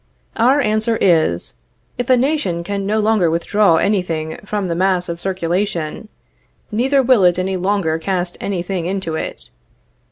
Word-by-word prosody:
Our 255 +6 +3
answer 220 0 +1
is: 160 - +2 0.5
If 245 - -2
a 255 - +6
nation 245 - 0
can 200 +1 -3
no 215 +2 +1
longer 215 -5 +2
withdraw 170 +3 +2
any 200 +4 +2
thing 160 -3 -4
from 205 -2 -3
the 170 - -1
mass 185 0 +1
of 170 0 -5
circulation, 185 -1 -2 0.6
neither 265 +5 +2
will 245 -5 +4
it 180 -1 +4
any 190 +1 -1
longer 185 -4 0
cast 180 0 -2
any 190 -3 -2
thing 180 -2 -3
into 190 -3 -3
it. - - -6
190 Hz, 160 wpm, -18 LUFS, 170-215 Hz, 0.6 s, a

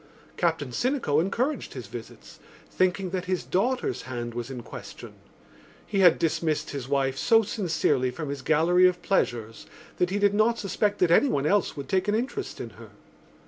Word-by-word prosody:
Captain 160 -6 0
Sinico 235 - +1
encouraged 245 - -2
his - - -6
visits, - - -11 0.3
thinking 185 0 0
that 185 -1 -3
his 185 -1 -1
daughter's 250 +7 0
hand 120 -2 -5
was 120 +1 -5
in 125 -3 -7
question. - - -10 0.7
He 200 - -2
had 180 -3 +6
dismissed 160 -1 -1
his 135 -3 -5
wife 135 -1 0
so 225 -1 +4
sincerely 160 - 0
from 140 +4 -6
his 140 -1 -4
gallery 165 +5 +4
of 180 -1 -2
pleasures 115 - -1 0.3
that 180 - +1
he 195 - -1
did 205 0 +3
not 220 +3 +3
suspect 205 0 -1
that 175 -2 +4
anyone 170 - +3
else 195 +1 +1
would 140 -2 -6
take 190 +4 0
an 205 - +2
interest 265 - -3
in - - -6
her. - - -12
180 Hz, 175 wpm, -26 LUFS, 140-205 Hz, 0.7 s, had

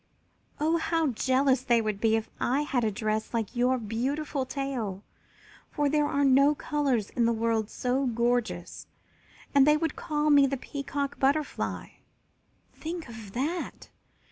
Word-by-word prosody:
"Oh, 320 +3 +2
how 325 -2 +1
jealous 260 +2 +2
they 240 -2 +3
would 215 -2 -2
be 225 -1 +3
if 220 -1 -2
I 265 +4 +1
had 260 -5 0
a 220 - +2
dress 215 +2 -2
like 225 0 -2
your 250 +2 +2
beautiful 260 +5 -2
tail, 255 -8 -3 0.7
for 290 -2 0
there 295 0 +2
are 280 0 +1
no 275 +2 +5
colors 275 -9 -1
in 235 - +1
the 235 - +3
world 225 -1 0
so 255 +2 -1
gorgeous, 240 0 -1 0.7
and 280 0 +6
they 300 0 +6
would 320 -1 -2
call 300 -1 0
me 285 -1 +6
the 275 +1 -2
Peacock 280 +1 -4
Butterfly! 285 +2 0 0.8
Think 330 0 -6
of 220 -4 -10
that! 310 +8 -3
265 Hz, 150 wpm, -28 LUFS, 230-290 Hz, 0.8 s, and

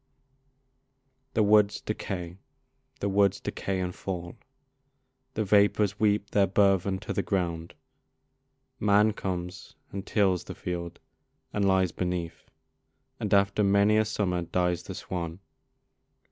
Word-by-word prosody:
<> 135 0 -47
The 110 - +4
woods 105 0 +4
decay, 90 -4 -5 0.6
the 100 - 0
woods 100 0 +2
decay 95 -1 -3
and 90 -1 -2
fall, 85 -3 -5 1.0
The 110 - 0
vapors 105 0 +3
weep 105 -1 +1
their 100 -1 +3
burthen 95 0 +2
to - - -4
the - - 0
ground, 85 -4 -2 1.0
Man 105 +1 +4
comes 90 -2 -5 0.2
and 100 -1 -5
tills 95 -5 +1
the - - -8
field 85 -1 -5 0.5
and 100 -1 +1
lies 95 -2 +3
beneath, 90 -2 -4 0.7
And 105 - -3
after 100 +1 +3
many 100 +2 +4
a 110 - +4
summer 95 -4 -1
dies 90 0 0
the 95 +1 -8
swan. 85 -2 -5
100 Hz, 125 wpm, -28 LUFS, 90-105 Hz, 1.0 s, The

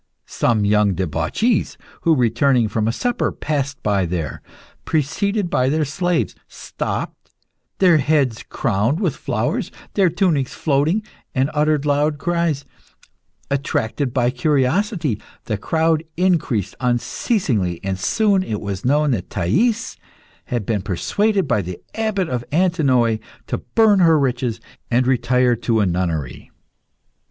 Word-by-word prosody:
Some 110 -3 +1
young 105 -2 +3
debauchees, 90 - 0 0.2
who, 165 -1 +3
returning 120 0 +2
from 105 +1 -1
a - - +2
supper, 245 - -1
passed 140 -4 -3
by 100 -3 +1
there, 80 -5 -4 0.4
preceded 180 +7 0
by 130 +1 +2
their 155 +1 +1
slaves, 175 +4 -1
stopped, - - -5 0.5
their 180 -4 +5
heads 140 -5 +1
crowned 115 - 0
with 180 -9 0
flowers, - - -2 0.2
their 190 -3 +3
tunics 165 -7 0
floating, 155 +8 +1 0.3
and 135 +2 +1
uttered 150 -1 +1
loud 145 +1 +1
cries. 170 -3 -1 0.9
Attracted 140 -1 -1
by 125 -1 +1
curiosity, 145 - 0 0.2
the 110 - -1
crowd 160 +8 +1
increased 165 - +1
unceasingly, 120 - 0
and 95 -1 -2
soon 200 - +2
it 110 - -3
was 100 -2 -5
known 145 +3 +2
that 100 -8 -2
Thais 190 - 0 0.5
had 120 -5 -3
been 105 -2 -1
persuaded 195 - 0
by 105 - +2
the 90 -1 -6 0.2
Abbot 215 -5 -1
of 125 -4 -2
Antinoe 140 -10 +2 0.3
to - - -3 0.2
burn 220 -3 +5
her 165 -3 +5
riches 125 -4 -1 0.3
and 125 +1 +2
retire 125 -1 +2
to 115 -1 0
a 105 - +3
nunnery. 85 -7 -2
135 Hz, 130 wpm, -20 LUFS, 110-165 Hz, 0.9 s, their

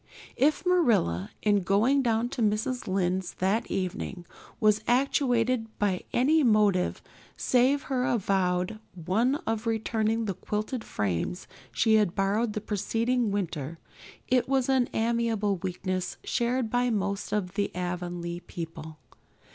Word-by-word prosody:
If 300 +6 +2
Marilla, 225 - +2
in 205 -1 +3
going 220 +10 +3
down 230 -1 +1
to 245 - -4
Mrs. 220 +4 0
Lynde's 185 -1 -1
that 195 +5 0
evening, 185 -1 -3 0.3
was 215 -1 +3
actuated 245 -2 +2
by 195 -3 0
any 300 +6 +3
motive 210 -6 +2 0.3
save 260 +3 +2
her 260 -3 -1
avowed 190 -3 0 0.2
one 205 - +1
of 225 +1 -2
returning 225 0 0
the 200 - -1
quilting 210 +7 -3
frames 105 - -2 0.3
she 220 -1 +3
had 205 -5 +1
borrowed 210 +3 +1
the 215 - -3
preceding 230 +3 0
winter, 165 -6 -3 0.5
it 255 0 +2
was 270 -1 +1
an 260 -2 +3
amiable 225 -3 0
weakness 185 0 -3
shared 240 -1 0
by 245 0 +2
most 200 -3 -2
of 195 -4 -1
the 200 0 0
Avonlea 175 -1 -4
people. 165 -3 -8
215 Hz, 130 wpm, -28 LUFS, 185-240 Hz, 0.5 s, in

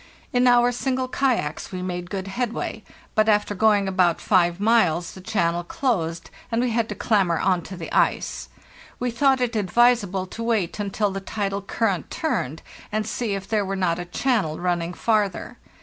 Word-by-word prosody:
In 250 0 +4
our 245 0 +5
single 255 +1 -1
kayaks 250 - -1
we 180 -1 -4
made 180 -1 -4
good 195 -1 -4
headway, 235 +4 -3 0.3
but 215 0 +3
after 210 -1 +2
going 205 -1 +3
about 185 -3 +2
five 175 -2 +2
miles 185 -7 +2
the 190 - -11
channel 175 -4 0
closed, 170 -6 -2 0.2
and 230 - +1
we 245 0 +1
had 230 0 0
to - - -4
clamber 195 -7 +2
on 180 0 +1
to 185 +2 -9
the 165 - -7
ice. - - 0 0.5
We 245 0 -1
thought 265 +2 +3
it 240 -2 0
advisable 205 -1 +2
to 205 +5 -8
wait 220 -6 0
until 205 0 -1
the 195 0 -4
tidal 200 0 -3
current 200 -2 -1
turned, 160 - -2 0.3
and 215 0 -1
see 225 -5 -2
if 195 -1 -6
there 215 -2 +1
were 195 0 -3
not 180 -3 0
a 175 - -4
channel 185 - 0
running 175 -1 -1
farther. 210 -2 0
200 Hz, 180 wpm, -23 LUFS, 180-230 Hz, 0.5 s, our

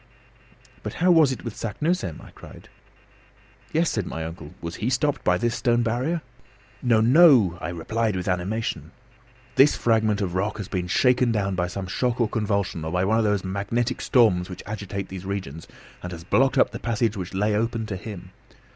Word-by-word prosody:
"But - - -6
how 180 +2 +3
was 160 -5 +5
it 130 - -5
with 115 -4 -6
Saknussemm?" 150 - -2
I - - -14
cried. - - -14 1.0
"Yes," 165 +1 +1
said 105 -5 -2
my 80 0 -4
uncle, 80 -2 -9
"was 85 0 -6
he 110 +5 -1
stopped 140 +3 0
by 90 0 +3
this 120 +5 0
stone 120 0 +1
barrier?" 130 +9 -1 0.6
"No, 115 -4 +3
no," 120 - +6
I 80 - -3
replied 105 +6 -1
with 90 -1 -4
animation. 95 +5 -2 0.6
"This 140 +2 +6
fragment 110 -3 +2
of 95 -4 -2
rock 100 +3 -1
has 105 -4 -5
been 90 -2 -3
shaken 125 +5 +3
down 100 -3 0
by 90 -1 -1
some 95 +2 -5
shock 120 +6 -1
or 120 - +3
convulsion, 100 -6 -1
or 80 - -4
by 90 +1 +1
one 110 +3 +2
of - - +2
those 105 -2 +1
magnetic 100 +6 -2
storms 100 -8 +3
which 90 -1 -8
agitate 100 -2 -5
these 95 -1 -7
regions, 95 -6 -5 0.3
and 90 - -6
has 85 -1 -8
blocked 130 +9 +2
up - - +4
the - - -6
passage 115 -2 0
which 95 -1 -6
lay 105 +2 +1
open 115 +1 -1
to 105 -3 -4
him. 95 -1 -8
105 Hz, 190 wpm, -24 LUFS, 90-120 Hz, 1.0 s, no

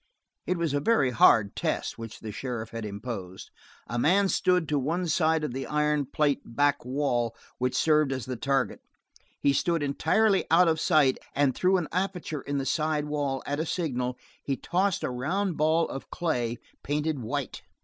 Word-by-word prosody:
It 180 - 0
was 165 -4 -1
a 145 - +2
very 145 - +2
hard 110 -3 +5
test - - -2
which 115 -1 -8
the 110 - -6
sheriff 115 -1 -5
had 115 -1 -5
imposed. 100 -3 -7 0.3
A 120 +2 -3
man 190 +8 +3
stood 180 -4 +2
to 150 -1 +1
one 170 +7 -1
side 160 0 +2
of 150 - -2
the 135 +1 -4
iron 150 -2 +1
plate 145 0 +1
back 145 +3 +1
wall 125 -3 -1 0.2
which 125 0 0
served 155 -2 +3
as 130 -2 -3
the 130 - -4
target. 135 +2 -1 0.6
He 140 - +3
stood 165 +2 +1
entirely 195 +8 +2
out 170 +2 +5
of 160 -1 +2
sight 150 -6 +3 0.2
and 140 -2 +3
through 185 +6 +2
an 175 -4 -2
aperture 180 -5 -2
in 145 0 -3
the 135 - -2
side 155 0 0
wall, 145 -3 -2
at 145 +1 -2
a 160 - 0
signal, 125 -8 -2 0.3
he 135 -2 -2
tossed 190 +1 0
a - - -1
round 175 +9 -1
ball 160 +2 +2
of 135 - -7
clay, 120 -9 -1 0.2
painted 150 0 -1
white. 110 - -4
145 Hz, 180 wpm, -27 LUFS, 125-165 Hz, 0.6 s, hard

